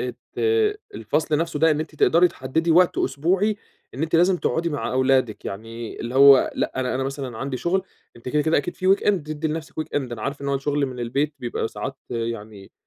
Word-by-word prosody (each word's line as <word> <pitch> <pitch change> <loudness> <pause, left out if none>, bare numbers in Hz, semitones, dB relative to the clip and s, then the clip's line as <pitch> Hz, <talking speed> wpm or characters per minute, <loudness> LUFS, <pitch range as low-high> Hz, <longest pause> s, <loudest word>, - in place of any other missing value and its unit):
آآ - - -3 0.2
ت - - -9 0.6
الفصل 150 0 0
نفْسه 165 -2 -2
ده 160 +2 +4
إن 150 0 +1
أنتِ 155 0 -6
تقدري 170 +4 +4
تحددي 160 +3 -2
وقت 175 +2 +4
أسبوعي، 185 +9 +1 0.4
إن 135 - -4
أنتِ 160 +1 +1
لازم 180 +2 +4
تقعدي 170 -1 -1
مع 145 -3 -3
أولادِك، 130 -3 +1
يعني 115 +3 -7
اللي 120 +2 -5
هو 140 0 +7
لأ - - -1
أنا 125 -1 -1
أنا 130 - -1
مثلًا 135 -4 -5
عندي 135 0 -3
شغل، 180 +7 0 0.3
أنتِ 120 - -8
كده، 150 +3 +1
كده، 160 +2 +2
أكيد 145 +5 -1
في 185 +1 +4
weekend 205 - +2 0.2
تدّي 155 +1 -3
لنفْسك 155 0 -5
weekend، 145 -5 -3
أنا 110 -2 -6
عارف 140 +1 -4
إن 140 - -3
هو 140 - +1
الشغل 140 +1 0
من 125 -2 -7
البيت 140 +5 -1
بيبقى 120 -3 -3
ساعات 110 +7 -6
يعني 110 -4 -5
140 Hz, 210 wpm, -23 LUFS, 125-160 Hz, 0.6 s, هو